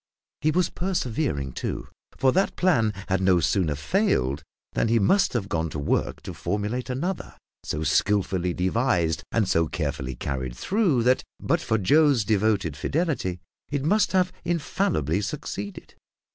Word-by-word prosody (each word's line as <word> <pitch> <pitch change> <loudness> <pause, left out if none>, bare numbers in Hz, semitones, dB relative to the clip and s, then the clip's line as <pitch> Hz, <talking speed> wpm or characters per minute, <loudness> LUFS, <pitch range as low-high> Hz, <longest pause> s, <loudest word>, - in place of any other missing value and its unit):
He 155 - +2
was 180 +3 +1
persevering, 130 - -1
too; - - -4 0.3
for 130 0 +4
that 190 +6 +1
plan 125 -13 +3 0.2
had 95 0 +1
no 95 -2 +4
sooner 80 0 +1
failed 70 -1 +1 0.3
than - - +1
he 115 +1 +3
must 190 - +3
have 110 -6 -1
gone 80 -3 -1
to 75 - -5
work 70 - -1
to - - -6
formulate 105 +7 -2
another, 170 +9 -3 0.3
so 75 - -3
skilfully 90 +3 +1
devised, 90 -4 +1
and 110 -4 +1
so 85 -3 +2
carefully 70 -5 -3
carried 65 -1 -4
through 185 - +1
that, 125 +2 +3 0.2
but - - 0
for 110 - +1
Joe's 140 - +4
devoted 100 -6 +1
fidelity, 135 - -1 0.3
it 145 -1 -2
must 210 +6 +3
have 185 -1 +3
infallibly 150 - 0
succeeded. 100 -4 -5
105 Hz, 145 wpm, -25 LUFS, -, 0.3 s, for